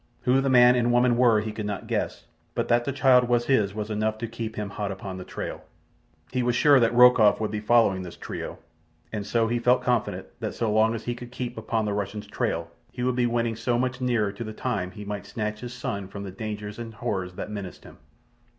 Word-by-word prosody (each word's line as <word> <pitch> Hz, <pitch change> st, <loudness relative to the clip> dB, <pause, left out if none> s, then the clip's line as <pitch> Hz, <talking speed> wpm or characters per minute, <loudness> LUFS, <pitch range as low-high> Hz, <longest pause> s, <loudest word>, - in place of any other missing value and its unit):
Who 130 Hz, +2 st, +3 dB
the 135 Hz, -, 0 dB
man 125 Hz, -1 st, +7 dB
and 120 Hz, -1 st, +2 dB
woman 120 Hz, 0 st, +4 dB
were 120 Hz, -3 st, +4 dB
he 110 Hz, 0 st, -4 dB
could 105 Hz, -1 st, -5 dB
not 105 Hz, -2 st, -4 dB
guess, -, -, -2 dB, 0.3 s
but -, -, -1 dB
that 120 Hz, 0 st, +3 dB
the 140 Hz, -, -1 dB
child 130 Hz, -2 st, +4 dB
was 120 Hz, -1 st, +2 dB
his 105 Hz, -7 st, +2 dB
was 110 Hz, 0 st, -4 dB
enough 110 Hz, +1 st, 0 dB
to 115 Hz, +1 st, -4 dB
keep 115 Hz, -1 st, -5 dB
him 105 Hz, -1 st, -4 dB
hot 100 Hz, -1 st, -3 dB
upon 95 Hz, -1 st, -6 dB
the 90 Hz, -, -6 dB
trail. -, -, -6 dB, 0.7 s
He 125 Hz, -, 0 dB
was 120 Hz, -1 st, +1 dB
sure 145 Hz, 0 st, +6 dB
that 115 Hz, -2 st, +3 dB
Rokoff 125 Hz, -4 st, +7 dB
would 110 Hz, -1 st, -2 dB
be 105 Hz, -, -2 dB
following 105 Hz, -3 st, +3 dB
this 90 Hz, -2 st, -8 dB
trio, -, -, -6 dB, 0.6 s
and 105 Hz, -1 st, -3 dB
so 115 Hz, +1 st, +2 dB
he 120 Hz, +1 st, 0 dB
felt 125 Hz, +1 st, +3 dB
confident 125 Hz, -3 st, 0 dB
that -, -, -4 dB
so 110 Hz, -3 st, 0 dB
long 110 Hz, +1 st, +3 dB
as 115 Hz, -, -6 dB
he 120 Hz, -, -2 dB
could 120 Hz, 0 st, -10 dB
keep 125 Hz, -1 st, -5 dB
upon 110 Hz, 0 st, -1 dB
the 105 Hz, -, -1 dB
Russian's 105 Hz, +1 st, -3 dB
trail 85 Hz, 0 st, -2 dB, 0.2 s
he 125 Hz, -, -5 dB
would 125 Hz, 0 st, +1 dB
be 125 Hz, -1 st, +2 dB
winning 115 Hz, -1 st, 0 dB
so 120 Hz, +2 st, 0 dB
much 125 Hz, +1 st, -1 dB
nearer 120 Hz, -5 st, +1 dB
to 105 Hz, +4 st, -6 dB
the 110 Hz, -1 st, -6 dB
time 110 Hz, -6 st, -2 dB
he 105 Hz, +2 st, -9 dB
might 105 Hz, 0 st, -5 dB
snatch 105 Hz, -1 st, -3 dB
his 120 Hz, -1 st, -6 dB
son 100 Hz, -5 st, -4 dB
from 100 Hz, +1 st, -7 dB
the 95 Hz, -, -6 dB
dangers 105 Hz, +1 st, -6 dB
and 115 Hz, -2 st, -7 dB
horrors 95 Hz, -6 st, -3 dB
that 105 Hz, -, -6 dB
menaced 100 Hz, -3 st, -7 dB
him. -, -, -14 dB
115 Hz, 240 wpm, -26 LUFS, 105-120 Hz, 0.7 s, man